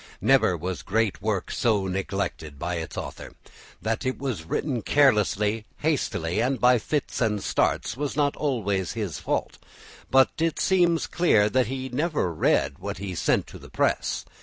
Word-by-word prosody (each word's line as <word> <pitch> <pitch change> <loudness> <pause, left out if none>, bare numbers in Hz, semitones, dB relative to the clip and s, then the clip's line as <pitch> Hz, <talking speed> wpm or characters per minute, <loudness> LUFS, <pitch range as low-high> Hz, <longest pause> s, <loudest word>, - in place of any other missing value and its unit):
Never 90 - +3
was 90 +3 -4
great 110 0 0
work 105 -3 -1
so 110 -6 +1
neglected 95 -5 -3
by 85 +4 -3
its 80 -1 -6
author. - - -7 0.5
That 110 +3 -1
it 130 -1 -1
was 120 - -4
written 125 - -2
carelessly, 105 -5 +2
hastily, 105 - -1
and 130 +2 0
by 125 -1 +5
fits 145 +4 -2
and 105 -4 +1
starts, - - 0
was 145 +1 -3
not 145 -1 +1
always 100 - -1
his 105 -9 -4
fault, - - -2 0.5
but 135 0 +5
it 165 0 0
seems 175 -3 +3
clear 110 -12 +3
he 130 +2 -4
never 145 - -1
read 75 - +1
what - - -5
he 95 0 -5
sent 85 - +1
to - - -12
the - - -13
press. - - 0
110 Hz, 160 wpm, -25 LUFS, 95-135 Hz, 0.5 s, by